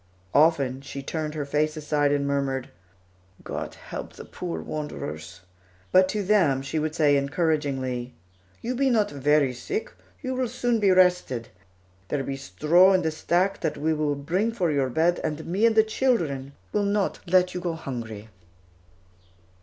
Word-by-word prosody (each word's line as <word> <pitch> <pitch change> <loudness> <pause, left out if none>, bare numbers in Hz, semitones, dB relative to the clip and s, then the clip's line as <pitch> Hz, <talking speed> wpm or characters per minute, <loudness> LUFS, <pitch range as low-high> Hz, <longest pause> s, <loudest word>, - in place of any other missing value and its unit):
Often, 140 -4 +3
she 140 0 -7
turned 155 +1 -3
her 150 -2 -2
face 150 +2 0
aside 150 -1 +1
and 145 -1 +1
murmured, 140 -2 -1 0.7
"God - - -5
help - - -8
the - - -10
poor 80 -1 -5
wanderers"; 80 - -6 0.5
but 185 0 +5
to 210 0 -1
them 175 -10 +3
she 155 +3 -2
would 155 +1 -2
say 150 -3 +4
encouragingly, 140 -4 -1 0.5
"You 245 - -1
be 270 +2 +2
not 215 -4 +2
very 145 -1 +2
sick, 420 - -4 0.3
you 260 0 -2
will 255 -1 0
soon 240 -1 0
be 205 -2 +3
rested. 180 -10 +3 0.6
There 145 -2 -1
be 135 - -3
straw 170 +7 +4
in 185 -1 +2
the 160 - 0
stack 175 +5 0
that 160 -3 -2
we 160 +2 +1
will 150 -1 0
bring 180 +11 0
for 180 -8 0
your 140 -3 +1
bed, 165 +7 +2
and 155 +1 -3
me 195 +7 +2
and 225 - +1
the 220 - +7
children 170 - 0 0.2
will 210 - +2
let 190 -3 +1
you 180 - -3
not - - -10
go 175 -2 -1
hungry." 115 -8 -6
155 Hz, 165 wpm, -25 LUFS, 140-185 Hz, 0.7 s, the